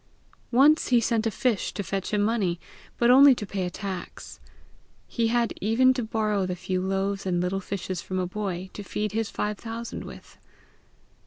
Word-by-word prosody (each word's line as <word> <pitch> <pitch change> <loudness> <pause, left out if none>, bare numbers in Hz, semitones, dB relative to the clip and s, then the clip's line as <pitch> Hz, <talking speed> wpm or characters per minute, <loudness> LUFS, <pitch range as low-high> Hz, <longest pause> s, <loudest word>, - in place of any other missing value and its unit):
Once 285 +6 +5
he 245 -2 +4
sent 230 -1 +1
a - - +2
fish 225 -1 0
to 205 - -3
fetch 195 0 -3
him 205 -1 +2
money, 205 -6 0 0.4
but 240 0 +4
only 270 +1 +8
to 210 - -5
pay 195 -2 -3
a - - -3
tax. 190 0 -7 0.7
He 230 -2 0
had 235 0 +1
even 245 +5 +4
to 255 - -2
borrow 215 -3 0
the 180 - -2
few 185 +1 -2
loaves 195 +1 -1
and 175 -1 +1
little 180 +2 -1
fishes 185 -2 -4
from 185 - -4
a 185 - 0
boy, 190 -1 -4
to - - -7
feed 210 +1 -3
his 220 0 -1
five 210 -1 -3
thousand 230 0 -6
with. - - -12
210 Hz, 185 wpm, -26 LUFS, 190-230 Hz, 0.7 s, only